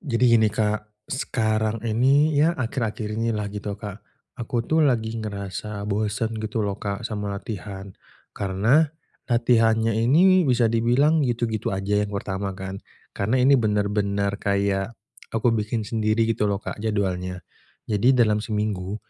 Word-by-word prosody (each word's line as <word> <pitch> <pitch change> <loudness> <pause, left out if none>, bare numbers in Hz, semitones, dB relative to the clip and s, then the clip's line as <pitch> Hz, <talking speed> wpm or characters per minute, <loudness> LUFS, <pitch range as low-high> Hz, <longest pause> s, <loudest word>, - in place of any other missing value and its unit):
Jadi 125 -6 0
gini 110 -1 +4
Kak, 105 0 -3
sekarang 110 -4 -1
ini, 135 +7 +3
ya 155 +4 +3
akhir-akhir 115 -4 -2
ini 115 +1 0
lah 105 -1 -2
gitu 105 -1 -5
Kak, 105 -1 -8 0.4
aku 120 0 -2
tuh 160 +6 +2
lagi 115 -4 0
ngerasa 100 0 -5
bosen 105 +2 -1
gitu 110 0 -2
loh 100 0 -3
Kak, 100 +2 -4
sama 105 -2 -3
latihan, 100 -1 -7 0.4
karena, 110 +11 +2 0.4
latihannya 115 -2 +3
ini 180 +10 +5
bisa 120 -2 +3
dibilang, 125 +8 +3
gitu-gitu 115 -3 -1
aja 100 +2 0
yang 105 0 -2
pertama 100 0 -3
kan. 95 0 -6 0.3
Karena 110 +6 0
ini 135 +2 +6
bener-bener 100 -1 0
kayak, 100 +2 0 0.4
aku 115 +1 +2
bikin 110 +1 -1
sendiri 110 +1 +1
gitu 110 -2 0
loh 100 -1 0
Kak, - - -6
jadwalnya. 90 -4 -2 0.4
Jadi 115 +5 +3
dalam 105 -3 +3
seminggu, 105 -3 -2
110 Hz, 140 wpm, -24 LUFS, 100-115 Hz, 0.4 s, ini